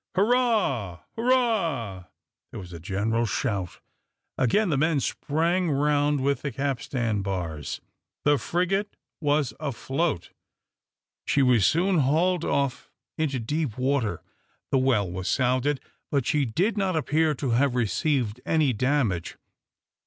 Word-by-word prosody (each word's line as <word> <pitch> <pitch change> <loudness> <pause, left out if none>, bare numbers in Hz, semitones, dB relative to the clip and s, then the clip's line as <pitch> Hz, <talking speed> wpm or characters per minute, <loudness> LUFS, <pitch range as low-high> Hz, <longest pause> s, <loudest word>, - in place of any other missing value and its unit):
"Hurrah! 200 - +1
hurrah!" 195 - +1 0.4
There - - -8
was 90 -2 -10
a 85 - -7
general 105 +7 0
shout. 100 -8 -2 0.6
Again 180 - +2
the 150 - +2
men 155 +1 +2
sprang 165 +6 0
round 145 0 +2
with 140 +1 0
the 140 - -3
capstan 125 -6 -1
bars; 85 -7 -4 0.4
the 145 -1 +4
frigate 195 +4 -1 0.3
was 145 -3 +1
afloat. 140 - -2 1.0
She 140 - +3
was 125 -6 +4
soon 180 +1 +2
hauled 165 +5 +2
off 140 -3 -1 0.3
into 140 -5 0
deep 140 +1 -2
water. 130 -8 0 0.5
The 135 - +4
well 125 -7 +2
was 90 +1 -4
sounded, 130 +2 +1 0.3
but 140 -4 0
she 150 -5 +2
did 190 - 0
not 190 -3 0
appear 155 0 +1
to 130 -2 -2
have 125 +2 +2
received 125 0 0
any 155 -5 +2
damage. 120 - 0
140 Hz, 125 wpm, -26 LUFS, 115-160 Hz, 1.0 s, the